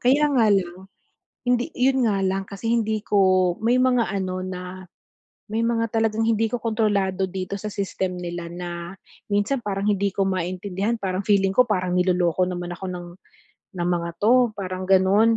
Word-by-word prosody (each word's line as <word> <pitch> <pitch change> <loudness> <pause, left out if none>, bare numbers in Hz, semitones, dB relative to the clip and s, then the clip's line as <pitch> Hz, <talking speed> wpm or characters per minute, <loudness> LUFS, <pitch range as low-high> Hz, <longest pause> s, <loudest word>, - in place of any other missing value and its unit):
kaya 285 +4 +4
nga 230 -5 +4
lang 185 -1 -1 0.6
hindi 245 +4 +1
'yon 260 -1 +3
nga 200 - 0
lang 190 +1 0
kasi 200 +3 -7
hindi 220 -2 0
ko 185 -3 +3
may 240 +2 +3
mga 250 -2 +3
ano 185 -2 -2
na 185 -1 -5 0.9
may 225 +1 -1
mga 230 -1 +1
talagang 225 0 +1
hindi 225 0 +2
ko 245 - -1
kontrolado 205 -4 0
dito 190 +1 -4
sa 215 - -5
system 190 -2 -3
nila 175 -1 -5
na 175 0 -6 0.4
minsan 205 +6 +1
parang 200 0 -2
hindi 200 -1 +1
ko 195 - +1
maintindihan, 190 +4 -2
parang 190 0 -2
feeling 195 -2 +3
ko 250 - +7
parang 185 -4 0
niloloko 180 -1 +2
naman 175 -1 -4
ako 190 - -8
ng, 175 -1 -7 0.7
ng 175 0 -1
mga 170 -1 0
'to, 240 +1 +4
parang 185 -1 -4
gano'n. 195 +4 +4
195 Hz, 170 wpm, -23 LUFS, 185-225 Hz, 0.9 s, ko